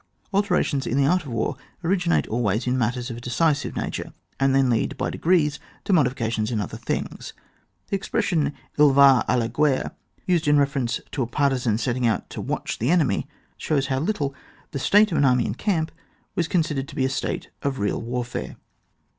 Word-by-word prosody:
Alterations 180 -8 +1
in 125 - 0
the 140 - +4
art 180 +1 +2
of - - -6
war 115 +4 -1 0.3
originate 175 0 +2
always 110 -1 0
in 125 0 +1
matters 125 0 -1
of 115 - -6
a - - -9
decisive 145 +4 0
nature, - - -4 0.3
and 135 0 +3
then 135 -1 +4
lead 115 -3 0
by - - -1
degrees 160 -4 +2 0.2
to 200 - 0
modifications 120 -8 +1
in 115 -3 -1
other 100 - -4
things. - - -4 0.6
The 200 - +1
expression 175 -8 0 0.3
tl 145 -2 +6
va 135 -4 +7
d - - +3
la 115 - 0
gHerrtf 135 +3 +1 0.3
used 170 -4 +1
in 145 0 +5
reference 135 -5 0
to 135 - -2
a 120 - 0
partisan 130 -4 +1
setting 120 +1 0
out 110 - -1
to - - -5
watch - - -3
the 120 - 0
enemy, 155 - +2 0.3
shows 140 -4 0
how 130 - +1
little 150 -4 -1 0.4
the 140 - -3
state 210 +8 +4
of 165 - +1
an - - +4
army 125 -2 +3
in - - -2
camp 160 - -1 0.4
was 170 - 0
con 175 -3 +2
sidered 140 -4 -3
to - - -11
be 130 - +1
a - - +3
state 135 - -3
of 140 -1 -1
real 105 -3 -1
warfare. 120 +1 -4
135 Hz, 195 wpm, -24 LUFS, 120-160 Hz, 0.6 s, va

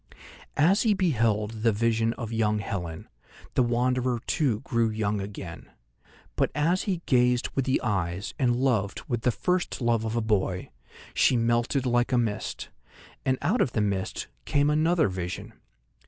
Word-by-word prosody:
As 175 +8 +4
he 215 -3 +3
beheld 115 - 0
the 115 0 +4
vision 115 +1 +1
of 115 -1 -6
young 105 -1 +1
Helen, 90 -5 -5 0.5
the - - +3
Wanderer 125 0 +1
too 130 -10 +1
grew 115 -1 +1
young 105 -2 -1
again. 95 -4 -8 0.7
But - - +1
as 165 +5 +1
he 175 -3 -1
gazed 125 -1 +3
with 135 - -1
the 130 - +2
eyes 95 -4 -2
and 125 -3 +3
loved 120 -6 0
with 120 -2 -1
the 125 - +2
first 180 - -1
love 120 -3 +1
of 110 +1 -2
a - - +2
boy, 95 -4 -1 0.4
she 125 - +4
melted 120 +3 +1
like 120 0 +2
a 125 - +3
mist, 110 -4 -2 0.6
and 130 0 +3
out 200 - +2
of 120 - +1
the - - 0
mist 100 -2 -2 0.2
came 145 +1 +2
another 160 -1 +3
vision. 90 -2 -5
120 Hz, 160 wpm, -27 LUFS, 105-130 Hz, 0.7 s, As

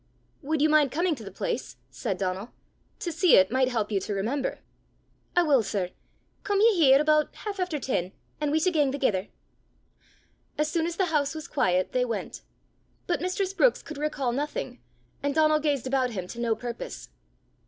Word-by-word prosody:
"Would 305 0 0
you - - +6
mind 300 -3 +4
coming 340 +4 +1
to 240 -7 -8
the 200 - -7
place?" 475 - -4
said 200 -7 -3
Donal. 190 +4 -3 0.5
"To 345 - -2
see 335 +2 +5
it 190 +2 +5
might 260 0 +3
help 225 -4 -1
you 200 - +2
to 200 +2 -4
remember." 250 +8 -1 0.8
"I 350 - +5
wull, 285 -6 +4
sir. 195 -3 -2 0.5
Come 405 -1 +1
ye 450 +2 +6
here 280 -7 +6
aboot 305 0 +3
half 410 -2 -6
efter 360 -4 -1
ten, 190 -10 -2 0.3
an' 300 -1 0
we 305 - +2
s' 315 - +1
gang 295 -5 +2
thegither." 220 -8 0 1.3
As 305 0 0
soon 330 -1 0
as 340 - -4
the 380 - +1
house 290 0 +1
was 315 +1 -6
quiet, 185 -9 +1
they 250 - +1
went. 235 -2 -4 0.6
But 350 - -1
Mistress 370 +1 -1
Brookes 475 +5 +3
could 310 -3 -8
recall 295 -4 -1
nothing, 295 - -4 0.4
and 285 0 -1
Donal 310 -1 +4
gazed 290 -4 0
about 260 -1 +1
him 190 -6 -4
to 235 - -8
no 235 -2 +1
purpose. 235 +1 -7
285 Hz, 185 wpm, -27 LUFS, 235-320 Hz, 1.3 s, you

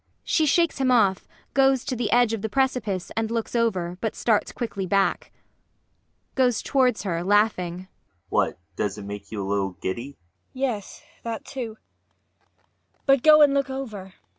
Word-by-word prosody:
[She 315 -2 +2
shakes 335 0 +2
him 265 -1 +2
off, 200 -6 +3 0.3
goes 270 -2 +3
to 255 - -2
the 235 -3 -1
edge 240 -2 +4
of 220 - -3
the 220 - -2
precipice 250 -7 -1
and 225 -1 -1
looks 230 +1 -3
over, 185 -7 0
but 220 - -2
starts 220 -3 +1
quickly 200 -5 -4
back. 195 +1 +1
ULFHEIM. - - -44
[Goes 250 -3 +2
towards 255 -5 +2
her, 170 -4 -2
laughing.] 185 -3 +1 0.4
What? - - +1 0.2
Does 100 0 -2
it 105 - -8
make 100 0 -8
you 105 -3 -3
a - - -5
little 100 -1 -1
giddy? 115 +7 -3
MAIA. - - -11
[Faintly.] - - -25 0.4
Yes, 250 -7 -3 0.2
that 230 -1 -5
too. 235 -5 -6 1.3
But 275 -2 +4
go 305 +1 +8
and 285 -1 +5
look 275 -1 +1
over. 215 -9 -6
220 Hz, 170 wpm, -25 LUFS, 185-260 Hz, 1.3 s, go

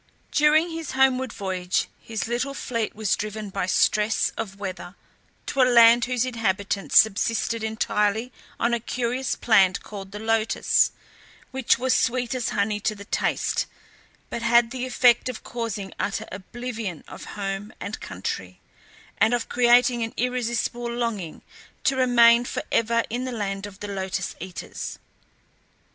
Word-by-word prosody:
During 310 +3 +4
his 325 -4 -5
homeward 260 -1 +2
voyage 185 -3 -1
his 220 -4 -4
little 245 +4 -2
fleet 230 -5 -3
was 215 -2 +1
driven 215 -1 -5
by 190 -1 -2
stress 210 +3 +2
of 195 -3 -5
weather 190 -2 -6 0.5
to 275 - 0
a - - +7
land 235 0 +7
whose 250 -1 0
inhabitants 200 -5 0
subsisted 220 +2 +3
entirely 220 +1 0 0.3
on 235 +1 +1
a 235 - +1
curious 245 +2 -2
plant 195 -5 +3
called 195 -2 -9
the 205 - -7
lotus, 225 +1 +2 0.6
which 265 -2 +2
was 255 +1 +1
sweet 250 0 +1
as 250 -2 -1
honey 205 +1 0
to 215 +1 -1
the 200 0 -11
taste, - - 0 0.6
but 235 - -3
had 235 0 +4
the 255 -1 -3
effect 250 -1 +4
of 250 - -6
causing 220 -5 -4
utter 200 - -2
oblivion 220 -2 -6
of - - -10
home 195 +1 -4
and 200 - -5
country, 90 0 -5 0.6
and 225 +3 +4
of 240 - -4
creating 240 0 +4
an 225 0 -3
irresistible 240 -1 -1
longing 230 -8 -3 0.4
to 270 - +2
remain 240 -2 +5
for - - -4
ever 230 0 +2
in 245 +2 -2
the 255 - -3
land 200 -3 -3
of 195 -1 -13
the 205 - -4
lotus 190 -2 -3
eaters. 185 +1 -6
230 Hz, 150 wpm, -24 LUFS, 200-245 Hz, 0.6 s, a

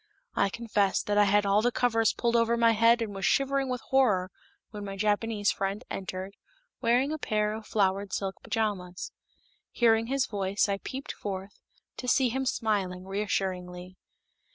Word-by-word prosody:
I 200 - +2
confess 205 -3 0
that 205 0 +1
I 205 - +6
had 205 +1 +3
all 200 +1 +3
the 245 +2 +2
covers 225 -3 +2
pulled 235 -1 -1
over 235 0 +3
my 230 -1 +5
head 230 +1 +4
and 210 -2 -5
was 195 0 -6
shivering 275 +3 +2
with 250 -1 -2
horror 210 -9 +3 0.4
when 210 -2 -7
my 195 -1 -6
Japanese 210 0 +1
friend 195 +4 -3
entered, 190 0 -5 0.5
wearing 250 +4 +2
a 310 - -3
pair 210 -4 0
of 220 0 -8
flowered 195 -1 0
silk 195 -1 -3
pajamas. 190 -5 -3 0.6
Hearing 225 -1 +3
his 270 0 +1
voice, 200 -1 0
I 200 -1 -1
peeped 265 +6 -6
forth, 195 0 -6 0.4
to 250 - -6
see 255 0 +3
him 265 +2 -2
smiling 195 -6 -1
reassuringly. 185 -2 -3
210 Hz, 165 wpm, -28 LUFS, 195-235 Hz, 0.6 s, I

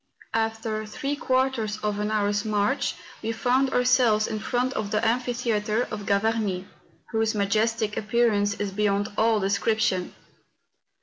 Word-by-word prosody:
After 225 -1 -1
three 280 +6 -3
quarters 255 -6 0
of 210 -1 -1
an 210 0 -1
hour's 205 -1 +1
march 215 +5 0 0.3
we 225 - -2
found 250 +4 +2
our¬ 250 -1 +1
selves 240 -4 +4
in 215 -1 -3
front 245 +4 -1
of 215 -4 -3
the 210 +2 0
amphitheatre 235 -2 0
of 210 -2 -5
Gavarnie, 200 -2 0 0.5
whose 225 -1 +1
majestic 215 +2 +1
appearance 210 -2 +2
is 205 -1 -3
beyond 205 0 0
all 220 0 +3
description. 200 -1 0
215 Hz, 135 wpm, -25 LUFS, 205-235 Hz, 0.5 s, selves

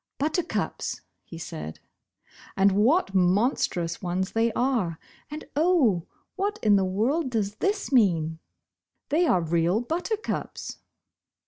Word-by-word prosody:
"Buttercups," 315 +4 -2 0.2
he 165 - -10
said, 80 - -7 0.8
"and 195 +1 +5
what 215 - +3
monstrous 180 -3 +1
ones 185 +1 -2
they 230 +1 +1
are, 235 -11 0 0.3
and 300 +1 -7
oh, 285 - +3 0.3
what 410 +2 -1
in 210 -2 +5
the 195 - +3
world 240 - 0
does 215 -3 -2
this 405 -3 -1
mean? 165 - +2 0.7
Thev 325 +2 +3
are 180 - +3
real 170 +4 +1
buttercups." 355 - -3
215 Hz, 115 wpm, -26 LUFS, -, 0.8 s, and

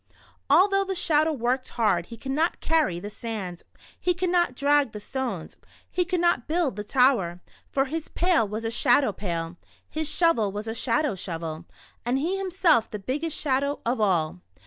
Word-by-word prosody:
Although 390 +1 +5
the 385 -1 -3
Shadow 315 -2 +2
worked 255 -1 -1
hard, 190 -7 +2
he 230 - -9
could 265 +4 -5
not 315 +5 +1
carry 310 - +1
the 205 +4 -7
sand, 205 -7 -5 0.4
he 360 -1 +1
could 365 0 -1
not 345 -8 +2
drag 285 -2 +2
the 210 - -6
stones, 265 +3 -4
and - - -30 0.3
he 360 - +1
could 365 -1 -1
not 345 -8 +2
build 320 - 0
the 210 - -4
tower, 210 -8 +2 0.3
for 270 0 +2
his 315 +3 -4
pail 345 - +2
was 215 +3 -4
a 225 - -1
shadow 245 0 +3
pail, 170 -4 -4 0.3
his 315 -1 -2
shovel 235 - +2
a 220 +2 -4
shadow 255 +3 0
shovel, 165 -3 -5 0.4
and 245 +2 0
he 330 +8 0
himself 350 - +2
the 210 - -5
biggest 290 +10 -3
shadow 280 0 0
of 235 0 0
all. 170 - +1
260 Hz, 180 wpm, -26 LUFS, 210-320 Hz, 0.4 s, Although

